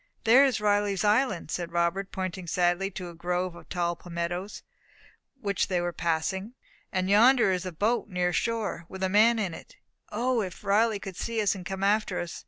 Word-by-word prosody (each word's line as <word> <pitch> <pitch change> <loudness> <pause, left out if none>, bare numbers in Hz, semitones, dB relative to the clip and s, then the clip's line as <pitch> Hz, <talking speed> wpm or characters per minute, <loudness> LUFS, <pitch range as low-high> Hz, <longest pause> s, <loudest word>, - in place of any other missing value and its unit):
"There 245 +5 +7
is 265 -6 +2
Riley's 205 -2 +1
Island!" 210 - +1
said 170 -1 -3
Robert, 170 +3 0
pointing 185 -1 -4
sadly 175 +3 +1
to 180 -2 -7
a - - -10
grove 180 +2 -2
of - - -14
tall 175 -1 -1
palmettoes, 175 +3 -5 0.8
which 200 -5 -1
they 180 -2 0
were 175 0 -2
passing. 190 +7 -2 0.4
"And 185 -1 0
yonder 230 +2 +5
is 185 0 -2
a - - -4
boat, 215 +7 0
near 180 -2 0
shore, 220 -6 -2
with 190 0 -6
a 190 - +1
man 220 +4 +5
in 195 -6 -2
it. - - -12 0.4
O, 240 +2 +1
if 185 -1 -6
Riley 210 +2 +3
could 195 -2 -8
see 230 -1 -2
us, 205 -2 +2
and 190 - -8
come 190 0 -4
after 205 -2 +1
us! 175 0 -5
190 Hz, 190 wpm, -27 LUFS, 175-210 Hz, 0.8 s, There